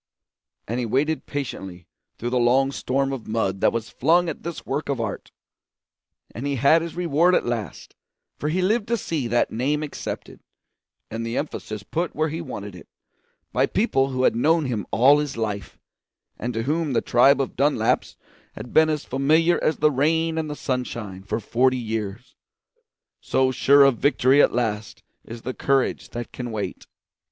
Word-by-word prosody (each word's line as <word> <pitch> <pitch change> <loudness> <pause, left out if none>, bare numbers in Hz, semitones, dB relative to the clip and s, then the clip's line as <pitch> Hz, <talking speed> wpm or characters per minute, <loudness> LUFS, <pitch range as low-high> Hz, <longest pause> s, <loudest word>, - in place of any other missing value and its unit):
And 120 +3 -2
he 125 - -1
waited 150 +7 0
patiently 95 - -5 0.3
through 120 +1 -4
the 125 - +2
long 130 +3 +3
storm 135 0 -1
of 130 -4 -7
mud 105 -4 -1
that - - +4
was 115 -1 -4
flung 175 +1 +2
at 155 - -6
this 170 -1 -6
work 145 +3 -3
of 135 -3 -1
art, 110 -3 -4 1.0
and 125 +6 -4
he 140 - -1
had 140 +6 +4
his 165 -1 -6
reward 175 +1 +3
at - - +1
last; 115 -7 -5 0.4
for 150 - -1
he 180 +4 0
lived 210 +3 +1
to 235 +1 +1
see 160 - -3
that 120 +1 +1
name 145 +6 0
accepted, 150 - -6 0.7
and 115 +1 -4
the 115 +1 -3
emphasis 110 -8 -4
put 170 +8 -3
where 155 +1 0
he 160 +3 -4
wanted 105 - -7
it, 90 - -13 0.7
by - - +2
people 135 - +1
who 130 -1 -1
had - - +3
known 155 +6 +2
him 115 -7 -3
all 140 +5 +5
his 145 -4 -3
life, 105 -3 -4 0.6
and 120 0 -3
to 115 - -1
whom 150 +2 -1
the 115 - +2
tribe 135 +4 +4
of 135 - -2
Dunlaps 135 -5 +1 0.4
had 125 - -9
been 160 0 +5
as 150 -2 -2
familiar 155 +6 +2
as 155 - +1
the 150 0 +3
rain 160 +4 +1
and 155 -1 -3
the 150 - -4
sunshine 120 -8 -4
for 105 +3 -3
forty 130 +4 +1
years. 110 0 -5 0.9
So 130 0 +1
sure 140 +2 +5
of 135 -4 +3
victory 140 0 +4
at - - +4
last 110 -3 -3 0.2
is 115 0 -10
the 130 - -3
courage 135 0 0
that 120 0 -6
can 125 -1 -6
wait. 110 -2 -5
135 Hz, 180 wpm, -23 LUFS, 115-150 Hz, 1.0 s, all